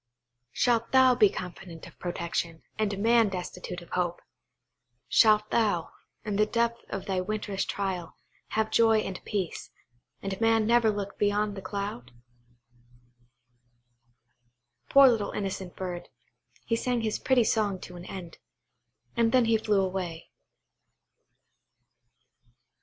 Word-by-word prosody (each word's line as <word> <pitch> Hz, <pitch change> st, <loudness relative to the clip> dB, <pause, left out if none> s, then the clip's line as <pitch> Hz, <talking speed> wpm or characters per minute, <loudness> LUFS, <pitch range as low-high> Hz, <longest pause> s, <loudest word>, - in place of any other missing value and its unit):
Shalt 235 Hz, -, +1 dB
thou 260 Hz, -1 st, +7 dB
be 215 Hz, -5 st, +5 dB
confident 175 Hz, -3 st, -8 dB
of -, -, -15 dB
protection, 170 Hz, -1 st, -3 dB, 0.2 s
and 205 Hz, -2 st, 0 dB
man 225 Hz, +1 st, +4 dB
destitute 180 Hz, -1 st, -6 dB
of -, -, -18 dB
hope! 175 Hz, -1 st, -1 dB, 0.9 s
Shalt 215 Hz, -1 st, +4 dB
thou, 205 Hz, -8 st, +1 dB, 0.3 s
in 205 Hz, -2 st, -2 dB
the 215 Hz, 0 st, +3 dB
depth 235 Hz, +1 st, 0 dB
of 195 Hz, -, -5 dB
thy 190 Hz, -2 st, -1 dB
winter's 205 Hz, 0 st, -2 dB
trial, 190 Hz, -4 st, -3 dB, 0.4 s
have 220 Hz, 0 st, +1 dB
joy 225 Hz, -1 st, +5 dB
and 190 Hz, -3 st, -6 dB
peace, 195 Hz, -5 st, -3 dB, 0.5 s
and 195 Hz, +2 st, -4 dB
man 225 Hz, -1 st, +3 dB
never 235 Hz, 0 st, +4 dB
look 205 Hz, -1 st, -4 dB
beyond 205 Hz, 0 st, +1 dB
the 195 Hz, -, -7 dB
cloud? 190 Hz, -, -5 dB, 2.8 s
Poor 275 Hz, 0 st, +8 dB
little 225 Hz, -5 st, +2 dB
innocent 190 Hz, -2 st, -4 dB
bird, 180 Hz, -2 st, -5 dB, 0.6 s
he 230 Hz, -, +1 dB
sang 245 Hz, +1 st, -1 dB
his 220 Hz, -1 st, -1 dB
pretty 260 Hz, -2 st, +3 dB
song 210 Hz, -3 st, +1 dB
to 180 Hz, -, -9 dB
an 175 Hz, 0 st, -9 dB
end, 180 Hz, -3 st, -8 dB, 0.8 s
and 230 Hz, -1 st, +2 dB
then 255 Hz, -2 st, +4 dB
he 225 Hz, 0 st, +3 dB
flew 210 Hz, -2 st, +2 dB
away. 180 Hz, -3 st, -4 dB
205 Hz, 125 wpm, -28 LUFS, 185-225 Hz, 2.8 s, Poor